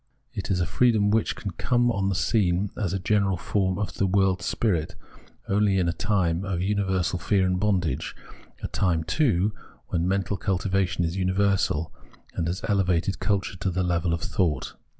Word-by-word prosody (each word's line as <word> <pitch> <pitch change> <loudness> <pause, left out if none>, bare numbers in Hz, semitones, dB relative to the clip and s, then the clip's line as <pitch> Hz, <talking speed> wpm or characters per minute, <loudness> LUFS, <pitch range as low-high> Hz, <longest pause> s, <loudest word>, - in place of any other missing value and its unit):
It 100 -5 -5
is 95 -2 +1
a 90 - +1
freedom 105 +2 +3
which 110 +1 +1
can 100 - -5
come 120 +7 +1
on 100 -3 0
the 95 - -1
scene 95 -1 +1
as 95 -5 -2
a 95 - 0
general 95 0 +1
form 95 +1 0
of 105 0 -3
the 100 - 0
world's 95 -2 +1
spirit 85 -9 0 0.5
only 100 -1 +2
in 90 -2 +2
a 85 - +1
time 90 -4 0
of 95 -3 -2
universal 95 -2 0
fear 95 +3 +2
and 90 0 0
bondage, 90 -9 0 0.5
a - - -1
time, 90 -5 0
too, 105 - +1 0.4
when 85 +1 0
mental 100 +1 0
cultivation 95 -2 0
is 85 +3 -3
universal, 95 -5 +1 0.4
and 85 - -2
has 90 +3 -3
elevated 95 -2 +1
culture 100 -2 -1
to 95 - -1
the 95 +1 -1
level 85 -1 0
of 85 -1 -1
thought. 85 -6 -1
95 Hz, 175 wpm, -25 LUFS, 90-100 Hz, 0.5 s, freedom